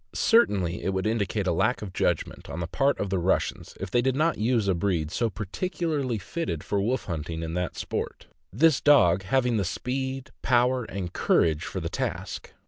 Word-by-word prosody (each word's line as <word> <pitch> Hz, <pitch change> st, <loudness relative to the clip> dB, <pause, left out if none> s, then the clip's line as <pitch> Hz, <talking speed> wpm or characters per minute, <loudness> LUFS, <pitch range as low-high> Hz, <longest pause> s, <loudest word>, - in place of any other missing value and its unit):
Certainly 100 Hz, -, +3 dB
it 95 Hz, -, -1 dB
would 95 Hz, -, -1 dB
indicate 105 Hz, -2 st, 0 dB
a 90 Hz, -, +2 dB
lack 110 Hz, +8 st, +1 dB
of 95 Hz, -3 st, -7 dB
judgment -, -, -1 dB
on 80 Hz, -, -5 dB
the 85 Hz, -, -2 dB
part 135 Hz, -, +1 dB
of 100 Hz, -2 st, -2 dB
the 95 Hz, -, +1 dB
Rus 90 Hz, +2 st, +2 dB
sians -, -, -14 dB
if 95 Hz, -1 st, -5 dB
they 120 Hz, -, +3 dB
did 130 Hz, +1 st, +1 dB
not 155 Hz, -1 st, +1 dB
use 115 Hz, -1 st, +1 dB
a 95 Hz, -, +3 dB
breed 85 Hz, -4 st, -1 dB
so 115 Hz, +5 st, 0 dB
peculiarly 135 Hz, -, -2 dB
fitted 100 Hz, -, -4 dB
for 100 Hz, -1 st, 0 dB
wolf 125 Hz, +6 st, -1 dB
hunting 80 Hz, -1 st, -4 dB
in 80 Hz, 0 st, -4 dB
that 90 Hz, 0 st, -2 dB
sport; -, -, -4 dB, 0.3 s
this 155 Hz, -, +4 dB
dog 100 Hz, -12 st, +5 dB
having 120 Hz, +4 st, +1 dB
the 100 Hz, -, +1 dB
speed, 130 Hz, +7 st, -3 dB
power, 125 Hz, 0 st, +2 dB
and 95 Hz, -4 st, -5 dB
courage 80 Hz, -2 st, +2 dB
for -, -, -4 dB
the -, -, -3 dB
task. -, -, -4 dB
105 Hz, 200 wpm, -26 LUFS, 90-130 Hz, 0.3 s, dog